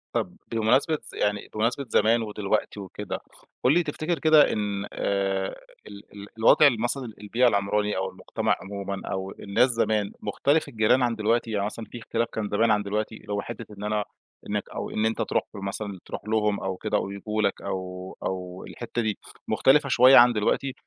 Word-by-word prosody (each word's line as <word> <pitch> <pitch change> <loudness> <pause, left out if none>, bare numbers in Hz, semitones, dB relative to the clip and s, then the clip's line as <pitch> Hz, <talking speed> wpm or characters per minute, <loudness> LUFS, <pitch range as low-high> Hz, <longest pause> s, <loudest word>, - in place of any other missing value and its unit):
طب - - -1 0.2
بمناسبة 125 +8 +2 0.2
يعني 105 0 -1
بمناسبة 115 +6 0
زمان 115 +2 +3
ودلوقتي 105 -1 -2
وكده، 100 +1 -6 0.5
قُل 130 - +6
لي 175 +2 +3
تفتكر 155 +2 -2
كده 155 -2 +5
إن 100 -1 -2
آآ، 95 -1 -1 0.3
ال 100 0 -11
ال 100 0 -9
الوضع 130 +6 +7
مثلًا 120 0 -2
البيئة 115 +4 +2
العمراني، 105 -1 +1
أو 95 0 -1
المُجتمع - - -1
عمومًا 100 0 -5
أو 95 0 -3
الناس 100 +6 +2
زمان، 110 -3 +1
مختلف 140 +9 +1
الجيران 110 +3 +3
عن 120 -1 +1
دلوقتي، 115 +2 0
يعني 100 -2 0
مثلًا 110 +2 -5
في - - -7
اختلاف 115 +1 -1
كان 105 -2 -3
زمان 110 +2 +2
عن 105 -1 +2
دلوقتي، 105 +2 -2
اللي 105 - -7
هو 100 - 0
حتِّة 115 +1 -7
إن 100 - -8
أنا 105 0 0 0.5
إنك - - -2
أو - - -5
إن 110 - -1
أنت 110 0 0
تروح - - 0
له - - -7
مثلًا 100 0 -5
تروح - - -6
لهم، 105 -2 +1
أو 95 -1 -3
كده - - -1
أو - - -2
ييجوا 105 +2 -3
لك، 100 -2 0
أو 95 -1 -5
أو 90 -1 -4
الحتِّة 120 0 -4
دي 110 -2 -1 0.3
مختلفة 140 +1 +4
شوية 130 +1 +7
عن 120 0 +8
دلوقتي، 120 +5 0
105 Hz, 185 wpm, -26 LUFS, 100-120 Hz, 0.5 s, عن